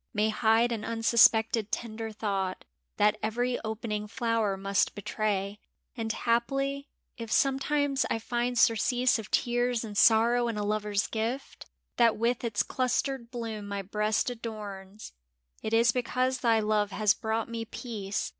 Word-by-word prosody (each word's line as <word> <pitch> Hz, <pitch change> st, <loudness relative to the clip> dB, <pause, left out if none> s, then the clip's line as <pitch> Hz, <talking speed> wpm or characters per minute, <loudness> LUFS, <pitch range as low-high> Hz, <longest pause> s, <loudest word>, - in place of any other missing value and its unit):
May 210 Hz, +1 st, +2 dB
hide 225 Hz, +2 st, +3 dB
an 225 Hz, -2 st, -3 dB
unsuspected 225 Hz, -1 st, +3 dB
tender 225 Hz, -1 st, -4 dB
thought 195 Hz, -3 st, -3 dB, 0.3 s
That 210 Hz, +1 st, +3 dB
every 245 Hz, +3 st, -1 dB
opening 220 Hz, -1 st, -3 dB
flower 225 Hz, -3 st, 0 dB
must 195 Hz, +1 st, 0 dB
betray. 205 Hz, 0 st, -2 dB, 0.4 s
And 225 Hz, -2 st, -2 dB
haply, 275 Hz, +5 st, -1 dB, 0.3 s
if 230 Hz, -1 st, -6 dB
sometimes 275 Hz, +1 st, +1 dB
I -, -, 0 dB
find 240 Hz, +2 st, -2 dB
surcease 245 Hz, +2 st, +3 dB
Of 215 Hz, -, -8 dB
tears 240 Hz, -1 st, +1 dB
and 210 Hz, -2 st, -7 dB
sorrow 235 Hz, +3 st, +4 dB
in 230 Hz, -2 st, -3 dB
a 210 Hz, -, -1 dB
lover's 210 Hz, -1 st, 0 dB
gift 230 Hz, +5 st, -4 dB, 0.3 s
That 235 Hz, -2 st, +4 dB
with 235 Hz, +3 st, 0 dB
its 225 Hz, -3 st, 0 dB
clustered 255 Hz, -1 st, -1 dB
bloom 225 Hz, -4 st, -5 dB
my 200 Hz, -1 st, -4 dB
breast 210 Hz, +4 st, 0 dB
adorns, 210 Hz, -3 st, -8 dB, 0.5 s
It 220 Hz, -, -4 dB
is 230 Hz, +1 st, +4 dB
because 255 Hz, +1 st, -1 dB
thy 230 Hz, -3 st, +3 dB
love 210 Hz, -1 st, +1 dB
has 205 Hz, 0 st, +2 dB
brought 220 Hz, 0 st, -2 dB
me 230 Hz, -1 st, -4 dB
peace. 220 Hz, -4 st, -4 dB
225 Hz, 145 wpm, -28 LUFS, 210-240 Hz, 0.5 s, sorrow